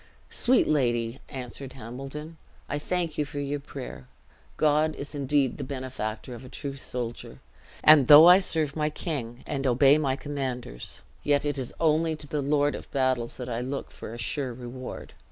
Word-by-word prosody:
"Sweet 255 +1 +3
lady," 120 -4 +1
answered 130 +1 -7
Hambledon, 135 +6 -8 0.3
"I 145 - -2
thank 170 0 -2
you - - +3
for 145 0 -6
your 145 +1 -2
prayer. 130 - -8 0.5
God 155 +1 +3
is 145 +2 -6
indeed 140 -2 +1
the - - -3
benefactor 130 -3 -5
of 120 +1 -9
a 130 - -10
true 140 0 -6
soldier; 125 -3 -6 0.4
and 150 -4 +8
though 150 +3 +11
I 180 +2 +9
serve 155 -6 0
my 150 -1 +1
king, 135 -7 -4
and 135 -1 -2
obey 135 +4 +5
my 135 -3 +1
commanders, 130 - -5 0.2
yet 145 0 +2
it 145 -1 -1
is 125 - -4
only 160 0 +2
to 150 - -9
the 145 0 -2
Lord 145 +1 +2
of - - -8
battles 130 -3 0
that 125 - -6
I 120 -1 -2
look 135 +3 -4
for - - -9
a 115 - -7
sure 130 0 -2
reward. 125 +1 -8
140 Hz, 175 wpm, -27 LUFS, 125-150 Hz, 0.5 s, though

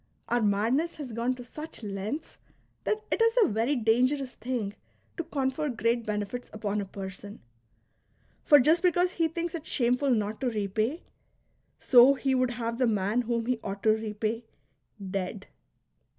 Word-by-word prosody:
Our 240 0 +2
madness 225 +11 +1
has 270 -6 -7
gone 235 +3 0
to 250 - -9
such 300 +1 -8
lengths 210 +9 -5 0.5
that 430 0 -1
it - - +1
is 455 0 +4
a - - +4
very 230 +7 +1
dangerous 255 +3 +2
thing 230 -4 -3 0.4
to 335 - -3
confer 290 -1 -1
great 230 -1 0
benefits 210 +3 -3
upon 210 -1 -2
a - - -4
person; 195 +1 -8 1.0
for 290 - +7
just 315 +6 +4
because 360 0 +3
he 330 -2 +1
thinks 335 +2 -4
it 325 -2 -6
shameful 250 +2 +1
not 215 -2 0
to 260 - +1
repay, 215 - -1 0.7
so 255 +2 +6
he 270 0 0
would 255 -1 +2
have 235 -1 -3
the 255 - +3
man 210 +2 +1
whom 235 -1 -1
he 250 -1 0
ought 195 0 -5
to 220 - +5
repay, 220 +1 -2 0.7
dead. 195 +1 -3
240 Hz, 160 wpm, -28 LUFS, 215-280 Hz, 1.0 s, for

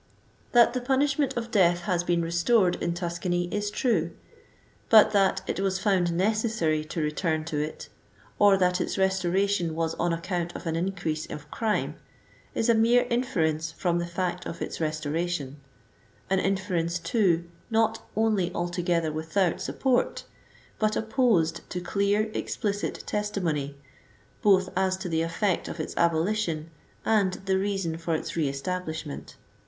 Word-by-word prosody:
That 235 -1 +6
the 255 - -1
punishment 275 +1 +1
of 235 0 -3
death 175 -4 +4
has 175 -1 0
been 175 -1 +1
restored 175 +3 +3
in 170 0 -1
Tuscany 175 0 -2
is 205 0 -1
true; 205 -7 +1 0.8
but 215 -2 +7
that 195 -2 +3
"it - - -3
was 195 -1 0
found 185 -3 +2
necessary 190 -4 +1
to 160 - -5
return 155 +1 -1
to 155 -2 -2
it," 150 +1 -4 0.5
or 205 -1 +6
that 180 -1 +2
its - - -2
restoration 190 -2 +1
was 165 0 -1
on 175 0 +1
account 175 0 -3
of - - -7
an 165 -1 -1
increase 170 -3 -2
of 150 0 -9
crime, 220 -2 -1 0.6
is 225 - +1
a 235 - +6
Ifiere 235 +2 +4
inference 165 -11 0
from 175 +1 0
the 170 - -2
fact 180 0 -3
of - - -6
its - - -5
restoration; 155 -1 -2 0.7
an 190 - +3
inference, 185 -3 0
too, 175 -3 +1 0.3
not 225 0 +1
only 215 -5 +1
altogether 175 -2 0
without 160 +3 0
support, 260 -2 0 0.6
but 215 0 +1
opposed 220 -9 +2
to 180 - -3
clear, 200 +4 0
explicit 205 -1 -2
testimony, 165 -9 -2 0.6
both 190 -2 +4
as 190 0 +1
to 190 0 -5
the 160 -1 +1
e€ect 170 +3 0
of 170 - -6
its 155 - -4
abolition 170 -1 0 0.3
and 200 -4 +3
the 190 0 +2
reason 195 -5 -2
for 165 -1 -1
its - - -4
re 155 -4 +1
establishment. 160 +1 -5
180 Hz, 150 wpm, -27 LUFS, 165-205 Hz, 0.8 s, but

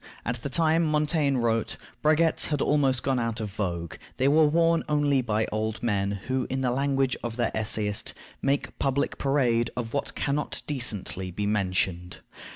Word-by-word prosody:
At 120 0 -3
the 140 - -3
time 160 +3 +3
Montaigne 150 -2 +1
wrote, 115 -2 0 0.2
braguettes 155 +1 +3
had 150 -2 -1
almost 135 -5 +2
gone 130 -2 +1
out 115 -1 -2
of 105 -2 -4
vogue: 85 -5 -4 0.2
they 130 - +2
were 155 +2 +5
worn 165 +2 +3
only 145 -2 +2
by 110 -2 0
old 110 +1 -2
men, 100 -3 0
who, 130 0 -1
in 130 0 -2
the 125 -2 +1
language 135 0 +1
of 115 -1 -4
the 120 -1 -1
essayist, 105 -1 0 0.3
"make 140 +1 -1
public 140 +1 0
parade 125 -5 +2
of 115 -2 -4
what 140 - -2
can 140 - -1
not 150 +1 -3
decently 105 -9 -1
be 100 +3 -3
mentioned." 95 -3 -1
125 Hz, 170 wpm, -26 LUFS, 110-145 Hz, 0.3 s, were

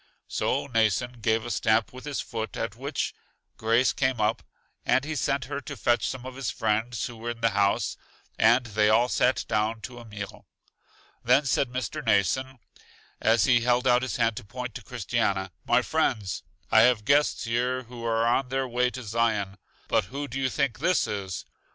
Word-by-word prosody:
So - - -1
Mnason 115 0 0
gave 110 +1 +1
a 120 - -4
stamp 110 +1 +2
with 130 +2 -10
his 145 -2 -2
foot, 110 -3 -5
at - - -3
which - - -3 0.4
Grace 115 +3 +2
came 130 -3 0
up, 105 +1 +1 0.4
and 130 - +2
he 160 +1 -3
sent 140 -1 0
her 140 +2 -4
to 140 0 -7
fetch 120 +3 +2
some 130 -1 -6
of 130 -1 -7
his 135 -3 -3
friends 110 +1 -1
who 120 - -7
were 115 +1 -5
in 120 -1 -5
the 115 0 +3
house, 100 0 +1 0.4
and 120 +3 +4
they 105 -1 +2
all 115 +3 +4
sat 125 +1 +2
down 110 0 0
to 120 0 -8
a 120 - -11
meal. 105 -2 -8 0.8
Then 125 +5 +4
said 135 -1 +1
Mr. 130 +5 -3
Mnason, 130 - +1 0.6
as 110 -1 +3
he 120 -2 +4
held 125 +1 +2
out 125 -1 +4
his 130 - -3
hand 115 -2 +1
to - - -5
point 125 +3 -6
to 125 - -8
Christiana: 100 -5 -1 0.2
My 120 +1 +4
friends, 115 - 0 0.3
I 110 - +7
have 115 -2 +4
guests 145 +4 +3
here 125 +2 0
who 120 0 -10
are 115 0 +1
on 125 +2 +1
their 135 0 -1
way 125 +1 +1
to 130 0 -7
Zion. 105 -3 0 0.3
But 110 -3 +2
who 140 +6 -5
do 130 +1 -4
you 130 - +1
think 140 -3 -1
this 175 +4 +2
is? 95 -3 -4
120 Hz, 195 wpm, -27 LUFS, 110-130 Hz, 0.8 s, I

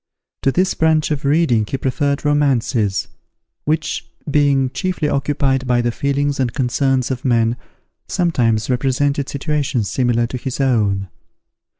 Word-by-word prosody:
To 135 - +2
this 185 +6 +1
branch 160 -1 +2
of 145 -1 -2
reading 140 -6 +3
he 135 - -2
preferred 140 +3 -1
romances, 130 -8 +1 0.6
which, 155 +1 -1 0.2
being 140 -3 +2
chiefly 180 -1 -2
occupied 135 -2 0
by 120 -1 +2
the 120 - +1
feelings 140 +2 -1
and 125 -3 +1
concerns 130 0 0
of 130 -1 -4
men, 115 -2 +2 0.5
sometimes 120 - +1
represented 135 +2 0
situations 140 - -1
similar 120 -2 +1
to 125 +2 -4
his 130 +2 -5
own. 105 -7 +1
135 Hz, 130 wpm, -19 LUFS, 120-145 Hz, 0.6 s, reading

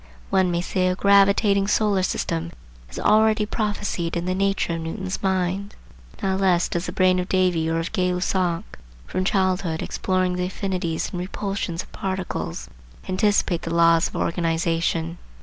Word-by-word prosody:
One 190 -1 +3
may 170 0 0
say 185 +1 0
a 180 - +1
gravitating 200 0 +4
solar 210 -2 +2
system 170 -2 -2 0.4
is - - -10
already 215 0 +3
prophesied 205 -6 -2
in 170 - -3
the 185 - 0
nature 195 -2 0
of 165 - -3
Newton's 185 +3 -4
mind. 190 +1 -1 0.5
Not 190 0 +1
less 180 -2 +3
does 175 +2 -3
the - - -3
brain 185 -1 +3
of 180 - -3
Davy 180 -4 +2
or 165 - 0
of 165 +1 -3
Gay 185 -4 +1
Lussac, 180 -1 0 0.4
from 185 - -2
childhood 185 -4 0
exploring 185 -1 -1
the 180 - 0
affinities 185 -4 -3
and 180 - -4
repulsions 185 -2 -3
of - - -20
particles, 185 - -4 0.4
anticipate 185 -3 +1
the 165 0 -3
laws 165 0 +5
of - - -12
organization. 165 0 -1
185 Hz, 160 wpm, -23 LUFS, 170-195 Hz, 0.5 s, laws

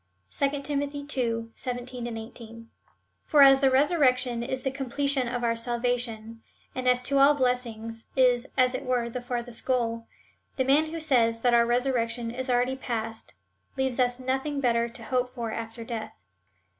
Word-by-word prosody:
(2 280 0 0
Tim. 285 0 -1
ii. 275 -5 -2
17, 245 -1 -5
18.) 230 0 -10 0.5
For 290 -2 +5
as 270 0 +7
the 270 - +5
resurrection 260 -4 +2
is 255 +2 -3
the 265 - 0
completion 270 0 0
of 245 0 -3
our 230 -1 +1
salvation, 235 -1 -2 0.3
and 255 0 -3
as 250 0 +3
to 275 +2 +2
all 280 +2 +6
blessings 230 -4 -2
is, 250 -1 +3
as 255 0 +4
it 255 - -3
were, 245 -2 -1
the 250 - -4
farthest 245 -1 -4
goal,^ 230 -3 -1 0.5
the 260 - 0
man 290 +4 +4
who 330 +1 -5
says 235 -7 +2
that 245 0 +3
our 235 0 +5
resurrection 240 -2 0
is 255 +2 -5
already 250 +1 +2
past, 225 - -5 0.4
leaves 265 -1 -1
us 245 0 +2
nothing 265 +3 -2
better 235 -3 +1
to 235 0 -10
hope 250 +1 -1
for 230 -3 -3
after 225 +1 -6
death. 225 -2 -6
250 Hz, 165 wpm, -27 LUFS, 235-265 Hz, 0.5 s, as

